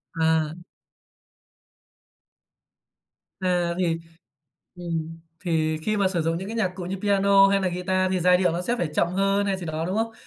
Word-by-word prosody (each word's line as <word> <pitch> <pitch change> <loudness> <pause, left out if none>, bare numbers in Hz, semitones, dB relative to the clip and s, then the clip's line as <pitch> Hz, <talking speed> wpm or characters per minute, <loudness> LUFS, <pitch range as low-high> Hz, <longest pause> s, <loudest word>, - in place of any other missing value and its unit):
À. 160 -1 +1 2.9
À, 180 -2 0
thì 165 -2 0 0.8
ừm, 165 -2 -4 0.2
thì 160 -3 0
khi 215 +5 0
mà 200 -2 +2
sử 175 -3 -1
dụng 165 +1 0
những 190 +2 -6
cái 225 - -5
nhạc 215 -5 +1
cụ 185 -1 -6
như 185 +2 -4
piano 200 -1 +5
hay 195 0 +2
là 190 - +1
guitar 185 +1 0
thì 185 - 0
giai 180 +1 +5
điệu 180 -2 +1
nó 175 +2 -2
sẽ 240 +6 -1
phải 175 - -1
chậm 170 - +2
hơn 195 +2 +1
hay 195 -1 0
gì 180 -2 -7
đó, 155 0 -3
đúng 185 +3 -2
không? 225 +1 -1
180 Hz, 180 wpm, -24 LUFS, 165-195 Hz, 2.9 s, piano